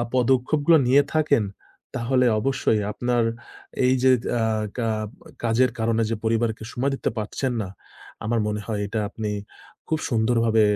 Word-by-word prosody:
পদক্ষেপগুলো 135 +5 +3
নিয়ে 140 +3 +6
থাকেন 145 -8 +3 0.5
তাহলে 125 +2 +2
অবশ্যই 135 -3 +1
আপনার 120 +1 0 0.6
এই 130 - +4
যে, 130 - +6 0.3
আ 115 - +2 0.3
কা 115 -2 0 0.6
কাজের 120 +2 +3
কারণে 115 0 +1
যে, 115 - 0
পরিবারকে 110 0 0
সময় 135 +3 0
দিতে - - -1
পারছেন 125 +5 -2
না, 95 - -6 0.6
আমার 115 +1 +1
মনে 105 0 -2
হয় 105 -2 -2
এটা 110 +2 -2
আপনি 105 -1 -4 0.6
খুব 160 - +1
সুন্দরভাবে 115 -1 +3
115 Hz, 140 wpm, -24 LUFS, 110-130 Hz, 0.6 s, নিয়ে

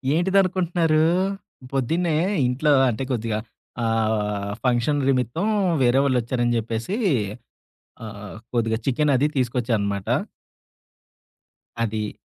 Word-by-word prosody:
ఏంటిదినుకుంటున్నారు? 175 -3 +2 0.7
పొద్దున్నే 160 +5 0 0.3
ఇంట్లో 135 +5 +1 0.2
అంటే 120 +3 -2
కొద్దిగా. 115 -3 -1 0.4
ఆహ్, 110 -3 0
ఫంక్షన్ 125 +4 +2
నిమిత్తం 130 - 0 0.4
వేరే 125 +2 +4
వాళ్ళొచ్చారని 120 -2 +1
చెప్పేసి. 115 - -3 1.1
ఆహ్, 105 -1 -9 0.2
కొద్దిగా 115 -1 +1
చికెను 145 +2 +2
అది 140 - +2
తీసుకొచ్చానమాట. 115 -6 -1 1.8
అది 110 -1 -3
120 Hz, 85 wpm, -23 LUFS, 110-150 Hz, 1.8 s, వేరే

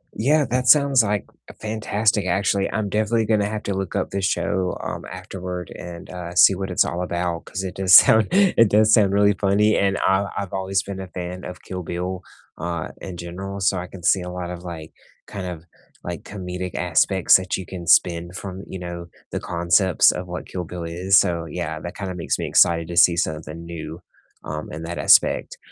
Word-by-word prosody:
Yeah, 145 +5 +2
that 125 0 0
sounds, 140 -4 +6
like, 105 -1 -1 0.4
fantastic 105 -2 0
actually. 100 +2 +1
I'm 105 -1 -2
definitely 110 +2 +1
gonna 105 -2 +1
have 110 -1 -5
to 100 - -2
look 95 -1 -4
up - - -2
this 100 -1 -1
show, 95 -1 -1
um, - - -5
afterward 90 -1 -7
and, 85 -1 -9
uh, 90 -1 -7
see 95 - +7
what 95 +1 -4
it's 90 - +2
all 90 +1 -3
about 85 -1 -3
'cause 95 - -5
it 95 - -5
does 95 -1 +5
sound 110 -1 +7
it 185 - +4
does 110 +1 +4
sound 100 -4 +5
really 100 0 +4
funny, 100 +4 +2
and 100 0 +1
I 95 +1 +2
I've 100 -2 -4
always 95 0 -1
been 100 -1 -7
a 95 - -6
fan 90 0 -7
of 90 - -8
Kill 90 -1 -6
Bill, 90 +2 -4 0.4
uh, 85 0 -4
in 90 -2 -7
general, 95 +3 -6
so 95 0 +1
I 90 +1 -5
can 90 -2 -12
see 95 +1 +3
a 90 - -6
lot 90 -1 -5
of, 90 0 -8
like 80 -3 -8 0.3
kind 95 -2 -6
of, 85 -2 -7 0.4
like, 90 -1 -6
comedic 90 -2 -6
aspects 90 +2 +3
that 95 -1 -3
you 95 - -7
can 90 -3 -8
spin 85 0 +3
from, 95 0 -7
you 95 - -7
know, 85 -1 -7 0.2
the - - -2
concepts 85 +1 +3
of 90 - -6
what 90 0 -6
Kill 90 -2 -5
Bill 85 0 -7
is, 90 +4 +2
so, 85 -3 0
yeah, 80 -1 -4
that 85 - -8
kinda 95 -2 -5
makes 85 - -2
me - - -3
excited 85 -1 +3
to 85 - -5
see 85 -1 +6
something 80 0 -3
new, 85 0 -8 0.4
um, 75 +1 -6
in 80 +1 -6
that 85 +1 -5
aspect. - - +3
90 Hz, 205 wpm, -22 LUFS, 85-100 Hz, 0.4 s, see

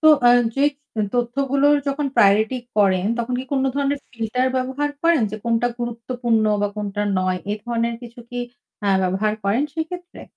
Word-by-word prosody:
তো 315 - +3 0.2
অ্যাঁ 245 0 +6
যে 275 - -1 0.4
এ - - +3
তথ্যগুলোর 275 +4 +2
যখন 280 +1 -1
প্রায়োরিটি 215 +5 +4 0.2
করেন, 190 -3 +3
তখন 240 +1 -1
কি - - -6
কোন 270 -1 +2
ধরনের 280 0 0
ফিল্টার 235 +3 -1
ব্যবহার 265 +3 -1
করেন? 335 -5 +4
যে 215 - -4
কোনটা 230 0 +2
গুরুত্বপূর্ণ 235 -1 -1 0.2
বা 205 - +2
কোনটা 205 0 -2 0.2
নয়, 185 0 0
এ - - +1
ধরনের 235 -1 -1
কিছু 240 0 -10
কি 245 - -4 0.4
অ্যাঁ 200 -2 +2
ব্যবহার 190 +3 +1
করেন 210 +8 +2
সেক্ষেত্রে? 350 +2 -6
240 Hz, 170 wpm, -22 LUFS, 215-275 Hz, 0.4 s, অ্যাঁ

